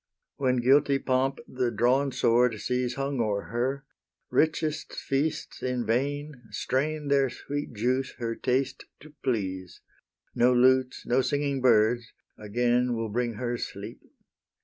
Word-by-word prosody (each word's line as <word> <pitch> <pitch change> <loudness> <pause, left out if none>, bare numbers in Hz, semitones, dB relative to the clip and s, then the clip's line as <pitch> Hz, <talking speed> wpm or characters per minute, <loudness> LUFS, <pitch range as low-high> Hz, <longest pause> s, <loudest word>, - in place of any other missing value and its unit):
When 130 -2 +2
guilty 135 +3 +4
Pomp 135 0 0
the 125 -1 -1
drawn 130 +4 +2
sword 120 -2 +2
sees 125 +1 -1
Hung 135 -2 -1
o'er 105 -3 -1
her, 130 +4 -1 0.5
richest 155 -1 0
feasts 140 +3 -2
in 125 -1 -1
vain 145 +3 -1
Strain 145 +7 -1
their 140 -1 +3
sweet 145 +3 -5
juice 125 +4 0
her 115 -2 -2
taste 130 +3 -1 0.2
to 150 +1 -14
please; 95 -8 -2 0.5
No 125 +1 +4
lutes, 130 +1 +3
no 125 +2 +3
singing 140 0 -1
birds 120 0 +3 0.2
again 120 +3 +1
Will 115 -1 -3
bring 120 +2 -1
her 120 0 -3
sleep. - - -7
125 Hz, 130 wpm, -27 LUFS, 120-135 Hz, 0.5 s, guilty